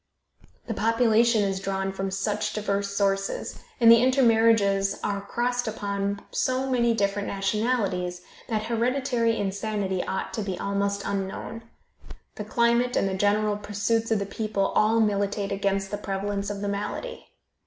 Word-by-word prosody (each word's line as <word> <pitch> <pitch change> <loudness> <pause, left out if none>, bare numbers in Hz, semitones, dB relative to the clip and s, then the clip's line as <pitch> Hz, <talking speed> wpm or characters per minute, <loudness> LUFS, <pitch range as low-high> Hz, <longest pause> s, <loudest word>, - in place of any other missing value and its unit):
The 225 - -3
population 230 0 +3
is 195 -1 -1
drawn 195 0 -2
from 195 0 -3
such 205 +2 -2
diverse 200 -1 -1
sources, 195 -1 -1 0.2
and 230 -1 +8
the 230 0 +7
intermarriages 225 -6 +3
are 200 -1 -1
crossed 245 +4 -1
upon 200 -1 -3
so 260 +1 0
many 235 -3 +2
different 200 -1 0
nationalities 195 -3 -1 0.2
that 215 -2 -1
hereditary 235 0 0
insanity 200 -1 -2
ought 190 - -4
to 220 - -2
be 190 -3 -3
almost 200 0 -1
unknown. 200 +3 -4 0.7
The 210 - -6
climate 235 +2 +2
and - - +2
the 190 - -2
general 205 +2 +1
pursuits 210 +2 -1
of 225 - +2
the 200 - -2
people 200 -1 -1
all 225 +2 +3
militate 200 -1 0
against 195 0 -1
the 205 - -3
prevalence 200 0 -3
of 200 -1 -5
the 205 - -2
malady. 205 - -4
205 Hz, 145 wpm, -26 LUFS, 200-230 Hz, 0.7 s, and